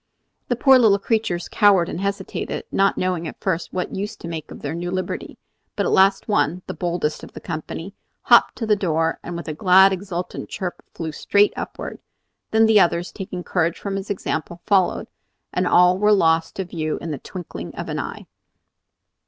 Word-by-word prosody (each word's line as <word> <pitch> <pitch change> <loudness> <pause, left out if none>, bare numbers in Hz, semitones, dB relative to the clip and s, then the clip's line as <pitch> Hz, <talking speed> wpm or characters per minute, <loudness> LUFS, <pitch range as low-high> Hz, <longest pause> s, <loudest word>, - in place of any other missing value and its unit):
The 245 - 0
poor 265 +2 +6
little 215 -4 +5
creatures 200 -4 -1
cowered 200 -5 +4
and 175 - -5
hesitated, 200 -1 -3
not 195 0 +2
knowing 180 -3 -1
at - - -9
first 180 -3 -2
what 180 -1 -3
use 205 +3 -4
to 170 - -9
make 160 -2 -6
of - - -11
their 145 +1 -3
new 175 +1 -4
liberty; 185 0 -4 0.4
but - - 0
at - - 0
last 195 +1 +4
one, 180 -4 +1
the - - -5
boldest 170 -4 -2
of - - -11
the - - -8
company, 165 +3 -6 0.3
hopped - - +5
to 230 - -3
the 215 -1 +3
door 165 -4 0
and 175 -1 -6
with 170 - -7
a 155 - -3
glad, 190 +4 +6
exultant 180 -2 -5
chirp 180 -2 -5
flew 160 -2 -5
straight 205 +6 +2
upward. - - -6 0.5
Then 220 0 +4
the 220 -1 +6
others, 175 -1 +2
taking 185 -3 -6
courage 170 -2 0
from 200 -1 -4
his 195 0 -5
example, 175 -3 -3
followed, 195 -3 +2 0.5
and 180 0 +1
all 180 +1 +5
were 210 +1 +4
lost 165 -5 +3
to 190 - -3
view 155 -3 -3
in 165 - -5
the 145 - -4
twinkling 155 - -8
of - - -5
an - - -3
eye. - - -6
180 Hz, 195 wpm, -22 LUFS, 170-200 Hz, 0.5 s, poor